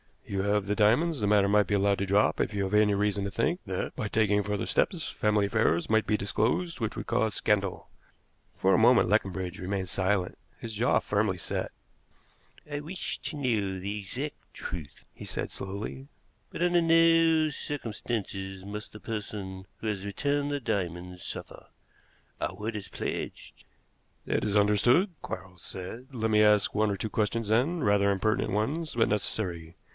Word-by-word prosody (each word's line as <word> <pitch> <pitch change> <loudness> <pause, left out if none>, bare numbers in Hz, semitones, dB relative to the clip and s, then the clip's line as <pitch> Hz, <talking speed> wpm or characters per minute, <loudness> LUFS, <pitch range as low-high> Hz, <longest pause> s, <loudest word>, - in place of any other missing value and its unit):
"You 100 -1 -2
have 100 0 +1
the 105 +1 0
diamonds; 125 +10 +3
the 105 - 0
matter 100 -1 +4
might 105 0 +4
be 105 - +1
allowed 100 0 +2
to 100 - 0
drop 100 +2 +3
if - - 0
you 100 -1 0
have 95 +1 -3
any 105 -1 +4
reason 100 0 0
to - - -2
think 140 - 0
that, 95 -2 -3
by 110 - -2
taking 105 -1 +2
further 105 -1 -2
steps, 170 -6 0
family 105 -1 +1
affairs 100 -5 +1
might 110 0 +3
be 105 - +3
disclosed 110 - 0
which 110 -2 -2
would - - -5
cause 110 -3 +1
scandal." 100 -4 0 0.7
For 95 0 +3
a - - +5
moment 120 -3 +5
Leconbridge 95 -3 0
remained 95 0 -2
silent, 95 -1 0 0.2
his 115 -1 -7
jaw 115 +4 +1
very - - -11
firmly 100 -2 0
set. 85 - -3 1.0
"I 145 - -2
wish 165 +5 -4
to 160 - -4
know 110 -9 0
the 100 +3 -4
exact 125 +9 -5 0.2
truth," 80 -6 -7
he - - -10
said - - -3
slowly, 100 +8 -6 0.4
"but - - -7
under 175 -1 +4
no 165 -1 +5
circumstances 105 -9 -4
must 105 +1 -7
the 105 - -10
person 100 -3 -5 0.2
who 110 - -3
has 100 -2 -2
returned 145 +7 0
the 145 -1 -2
diamonds 90 -4 -3
suffer. - - -6 0.7
Our - - -2
word 110 +2 -4
is 100 - -7
pledged." - - -6 0.6
"That - - 0
is 105 -1 0
understood," 120 - +4
Quarles 95 -2 -7
said. 115 +8 -7
"Let 110 -1 0
me 105 0 +5
ask 105 -1 +4
one 110 0 +2
or 100 - -1
two 110 - -3
questions, 110 +1 -1
then 140 +9 +2
rather 100 0 +4
impertinent 100 +1 +1
ones, 145 +10 -1
but 115 -1 +3
necessary. 90 -5 -2
105 Hz, 175 wpm, -29 LUFS, 100-115 Hz, 1.0 s, a